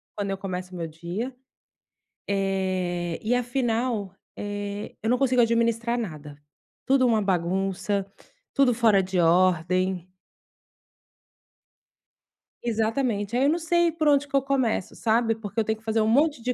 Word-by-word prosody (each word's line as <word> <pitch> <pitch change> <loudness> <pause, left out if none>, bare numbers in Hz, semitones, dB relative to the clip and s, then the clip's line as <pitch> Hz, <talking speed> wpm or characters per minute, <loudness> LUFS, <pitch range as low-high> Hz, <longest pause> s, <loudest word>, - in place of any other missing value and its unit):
Quando 200 -1 -2
eu 195 - -2
começo 185 -1 -5
meu 170 -2 -3
dia. 175 +11 -5 1.0
Eh, 185 -3 -1
e 225 +3 +1
afinal, 240 -5 -1 0.2
eh, 205 0 -5
eu 220 - 0
não 250 - +3
consigo 255 -2 +3
administrar 235 +1 +1
nada. 150 -9 -7 0.5
Tudo 265 -1 +4
uma 225 -3 +3
bagunça, 190 +2 -1 0.5
tudo 275 -3 +4
fora 220 -4 +4
de 185 -1 -1
ordem. 180 +1 +2 2.6
Exatamente, 225 -1 -1
aí 255 - +2
eu - - +4
não 330 +3 +1
sei 345 +1 +2
por 310 -1 -1
onde 285 -1 +4
que 275 - -4
eu 275 - +4
começo, 260 -8 -1
sabe? 225 0 +1
Porque 210 -1 -5
eu - - +3
tenho 220 0 -1
que 220 - -23
fazer 220 0 +1
um 215 - +2
monte 285 +3 +3
de 250 +2 -1
220 Hz, 145 wpm, -25 LUFS, 190-245 Hz, 2.6 s, Tudo